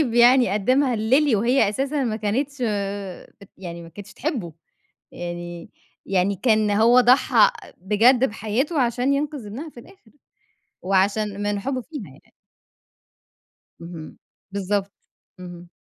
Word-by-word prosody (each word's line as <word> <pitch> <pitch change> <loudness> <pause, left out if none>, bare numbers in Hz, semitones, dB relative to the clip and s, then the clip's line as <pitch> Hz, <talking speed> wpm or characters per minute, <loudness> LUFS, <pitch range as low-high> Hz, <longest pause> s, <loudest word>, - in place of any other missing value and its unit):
يعني 245 -1 +6
قدَّمها 255 +5 +2
لLily 250 +4 +2
وهي 235 +1 +2
أساسًا 270 +5 -2
ما 220 -3 -1
كانتش 255 +7 -2
آآ، 200 -3 -4
بت 200 - -15
يعني 170 -2 -8
ما 165 - -12
كانتش 205 +4 -12
تحبه، 240 - -4 0.6
يعني 175 0 -7 0.4
يعني 195 +1 +1
كان 215 -1 +2
هو 230 +4 +5
ضحَّى 250 +2 +5 0.3
بجد 230 +7 +3
بحياته 250 - -1
عشان 245 +3 +1
ينقذ 285 -5 -3
ابنها 265 +11 -7
في 240 - -13
الآخر، 260 - -20 0.7
وعشان 200 +2 0
من 205 0 -1
حبه 260 +3 -3
فيها 290 -4 -8
يعني. 135 -3 -18 1.5
اهم، 170 -2 -10 0.4
بالضبط، 200 0 -2 0.5
اهم. 175 -1 -10
215 Hz, 125 wpm, -22 LUFS, 195-255 Hz, 1.5 s, يعني